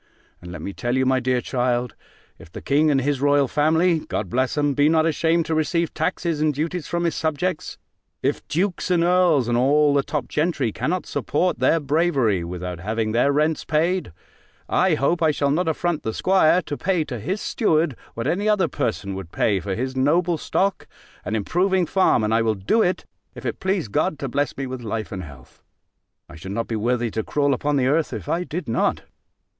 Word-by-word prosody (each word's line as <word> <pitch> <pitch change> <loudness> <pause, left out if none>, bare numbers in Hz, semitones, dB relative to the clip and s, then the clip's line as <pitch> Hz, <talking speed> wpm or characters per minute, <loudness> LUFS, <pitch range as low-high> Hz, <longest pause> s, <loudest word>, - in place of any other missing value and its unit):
And 90 0 -9
let 85 -3 -8
me 100 - -5
tell 120 +5 -2
you, 130 - +2
my 130 0 +2
dear 125 0 0
child, 125 -2 -1 0.5
if 80 - -14
the - - -7
king 150 +3 +2
and 135 -2 +2
his 140 0 -1
royal 145 -1 +3
family 160 +4 +2
(God - - -4
bless 130 +4 0
'em!) 145 -1 +2
be 145 +2 +3
not 160 0 +3
ashamed 165 +1 +1
to 165 - -2
receive 165 +1 0
taxes 170 -4 -1
and 155 0 +3
duties 160 +3 -3
from 170 0 -2
his 170 -2 +1
subjects; 160 +3 -2 0.5
if - - 0
dukes 180 +4 -1
and 175 -2 +3
earls, 175 -7 +3
and 120 0 +1
all 145 +3 +4
the 140 - +3
top 140 -2 -3
gentry, 150 -7 0
cannot 180 - -2
support 180 0 -1
their 165 - +3
bravery, 140 - +1
without 90 0 -5
having 110 +4 -2
their 120 +5 +3
rents 150 +2 +1
paid; 165 - 0 0.6
I 185 -4 +2
hope 165 +5 0
I 160 - +4
shall 140 -1 +1
not 170 +5 0
affront 160 0 -1
the 110 -4 -4
'squire, 185 -2 +3
to 145 - -4
pay 180 -3 0
to 125 -6 -6
his 185 - -3
steward, 160 - +1 0.2
what 115 - -4
any 195 +8 0
other 210 -3 +3
person 100 -4 -3
would 95 -3 -7
pay 100 -4 +1
for 95 0 -4
his 130 +4 -3
noble 165 +5 +2
stock, 195 +5 -1 0.4
and 110 - -3
improving 180 - +1
farm: 185 - +2
and 110 +1 0
I 115 - +3
will 110 -1 +1
do 100 - +1
it, 180 -3 0 0.3
if - - -10
it - - -3
please 190 - -1
God 155 - 0
to 135 - -4
bless 140 +2 -1
me 135 - -3
with 130 -1 -6
life 110 -1 -4
and 95 -3 -5
health. 70 -5 -14 0.7
I 85 - -12
should 95 +4 -7
not 115 +2 -2
be 115 - -3
worthy 120 +1 0
to 110 - -2
crawl 145 +5 +1
upon 145 +3 -1
the 135 -2 +2
earth, 150 +4 +1
if - - -6
I 175 +2 0
did 175 0 -5
not. 115 - 0
145 Hz, 210 wpm, -22 LUFS, 120-170 Hz, 0.7 s, all